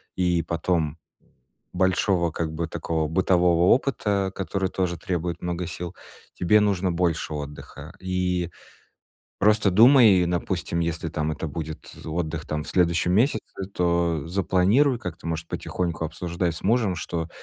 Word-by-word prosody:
и 90 -2 +1
потом 80 -2 -1 0.8
большого, 95 -1 +2
как 80 0 -3
бы, 85 +1 -2
такого 80 -1 -2
бытового 85 0 +3
опыта, 105 -7 0
который 95 0 -2
тоже 90 -2 -2
требует 85 0 -3
много 90 0 -3
сил, 90 +2 -6 0.4
тебе 100 +4 +4
нужно 95 -3 +1
больше 85 -3 -1
отдыха. 75 -1 -8
И 90 -1 -1 0.9
просто 105 0 +3
думай, 115 -3 +7
и, - - +1
допустим, 85 0 -2
если 85 0 -2
там 80 0 -2
это 75 +2 -4
будет 80 +1 -7
отдых 80 -1 -3
там 75 0 -2
в - - -11
следующем 90 0 +2
месяце, 110 +3 +2 0.3
то 85 -3 +1
запланируй 100 - +2
как-то, 90 -5 -7
может, 80 0 -4
потихоньку 85 -2 -3
обсуждай 85 +2 -2
с 80 - -9
мужем, 110 -2 +2
что, 85 -1 -4
90 Hz, 140 wpm, -25 LUFS, 85-95 Hz, 0.9 s, думай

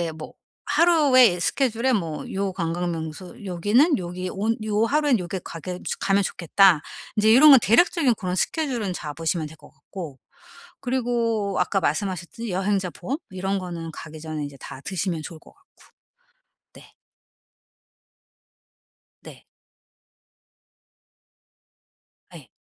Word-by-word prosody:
인제 165 -2 -3
뭐 155 - -9 0.3
하루에 290 - +5
스케줄에 255 +5 +1
뭐 165 -8 -2
요 195 0 -1
관광명소 170 +1 -4
여기는 205 - +3
요기 180 +1 -5
온 220 +4 -1
요 215 +1 +1
하루에 295 -1 +2
요게 180 +1 -4
가게 180 +2 -6 0.2
가면 200 0 +2
좋겠다. 175 -1 +3 0.3
인제 215 +1 +4
요런 300 +3 +9
건 270 -4 +9
대략적인 275 - +4
그런 185 -3 -3
스케줄은 245 - -1
잡으시면 160 +1 -3
될 160 - -14
것 - - -18
같고. 160 -9 -9 0.6
그리고 235 -5 -1
아까 195 +2 +1
말씀하셨듯이 185 +7 -3
여행자 190 0 0
보험 275 - -4
이런 190 +1 -2
거는 170 -3 -6
가기 155 0 -10
전에 155 -1 -5
인제 145 -1 -8
다 130 - -9
드시면 180 -3 -2
좋을 160 +1 -9
것 - - -19
같고. - - -32 1.1
네. - - -17 2.3
네. - - -13 2.9
네. - - -12
190 Hz, 255 characters per minute, -24 LUFS, 170-230 Hz, 2.9 s, 요런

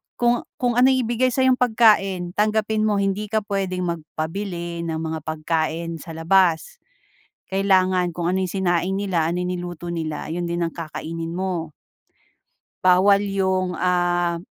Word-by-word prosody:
kung 240 0 +2 0.2
kung 245 -1 +1
anong 260 +1 +5
ibigay 240 +2 +1
sa'yong 260 0 +3
pagkain, 210 -7 +3
tanggapin 215 0 +1
mo. 210 - +2
Hindi 200 +2 -1
ka 220 - +1
puwedeng 190 -3 -2 0.2
magpabili 170 +2 -5
ng 160 -1 -2
mga 160 0 -3
pagkain 160 +1 -2
sa 165 - -9
labas. 180 - +2 0.7
Kailangan 185 -2 +2
kung 175 - -3
ano 190 - 0
yung 180 - -2
sinaing 185 0 0
nila, 190 -5 0
anong 180 +1 -2
niluto 175 -1 -6
nila, 155 -3 -4
ayun 175 0 -2
din 170 0 -2
ang 165 - -5
kakainin 165 0 -6
mo. 180 -4 -3 1.1
Bawal 195 +2 +5
yung, 190 -2 0
ah 175 -1 +1
180 Hz, 140 wpm, -22 LUFS, 170-200 Hz, 1.1 s, anong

